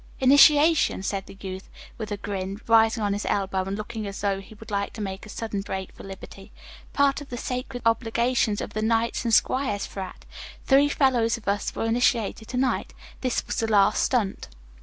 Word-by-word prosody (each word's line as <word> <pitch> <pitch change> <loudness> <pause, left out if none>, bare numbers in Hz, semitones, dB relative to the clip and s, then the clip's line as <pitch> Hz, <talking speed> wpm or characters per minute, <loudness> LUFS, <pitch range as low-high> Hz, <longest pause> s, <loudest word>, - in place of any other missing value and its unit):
"Initiation," 290 - +5
said 195 0 -3
the - - -12
youth, 190 0 -7 0.3
with 215 -2 -5
a 205 - -2
grin, 195 0 -4
rising 225 0 +4
on 205 -1 +1
his 205 - -3
elbow 190 -1 0
and 195 +1 -3
looking 215 0 -5
as 200 -1 -6
though 200 -1 0
he 205 +3 -14
would 215 +1 -12
like 200 0 -2
to - - -9
make 195 0 -5
a - - -13
sudden 210 -2 -4
break 190 -1 -5
for - - -13
liberty. 195 +1 -11 0.4
"Part 280 0 +2
of 290 - -10
the 245 - -5
sacred 250 0 -4
obligations 230 -1 +1
of - - -6
the 215 - -2
'Knights 230 +2 0
and 230 - +1
Squires' 220 -3 +2
frat. 190 -2 -8 0.4
Three 280 +1 +5
fellows 250 -6 +2
of 230 - -16
us 200 +1 -1
were - - -2
initiated 225 -1 +1
to 250 - -4
night. 260 0 -1 0.3
This 255 -2 -1
was - - -4
the 225 - 0
last 210 -1 +4
stunt." 220 -7 0
220 Hz, 200 wpm, -25 LUFS, 200-245 Hz, 0.4 s, Initiation